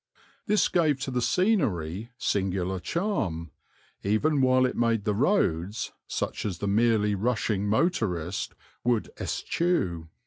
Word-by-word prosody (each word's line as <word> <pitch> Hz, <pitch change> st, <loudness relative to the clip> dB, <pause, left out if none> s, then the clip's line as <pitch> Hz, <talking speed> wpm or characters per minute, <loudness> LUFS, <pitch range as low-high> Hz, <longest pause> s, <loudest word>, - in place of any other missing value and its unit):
This 210 Hz, 0 st, +3 dB
gave 155 Hz, -6 st, +2 dB
to 135 Hz, -, -3 dB
the 125 Hz, -1 st, 0 dB
scenery 115 Hz, -, +1 dB
singular 95 Hz, -3 st, -1 dB
charm, 95 Hz, -, -2 dB, 0.5 s
even 135 Hz, +9 st, +2 dB
while 130 Hz, 0 st, +4 dB
it 125 Hz, -, -1 dB
made 115 Hz, -3 st, +1 dB
the 105 Hz, -1 st, +1 dB
roads 105 Hz, -, +1 dB, 0.2 s
such -, -, -3 dB
as 95 Hz, -5 st, -3 dB
the 100 Hz, -, -3 dB
merely 105 Hz, 0 st, +3 dB
rushing 105 Hz, -1 st, 0 dB
motorist 100 Hz, -, 0 dB, 0.3 s
would 120 Hz, -3 st, +1 dB
eschew. 95 Hz, -, -1 dB
110 Hz, 125 wpm, -27 LUFS, 95-135 Hz, 0.5 s, while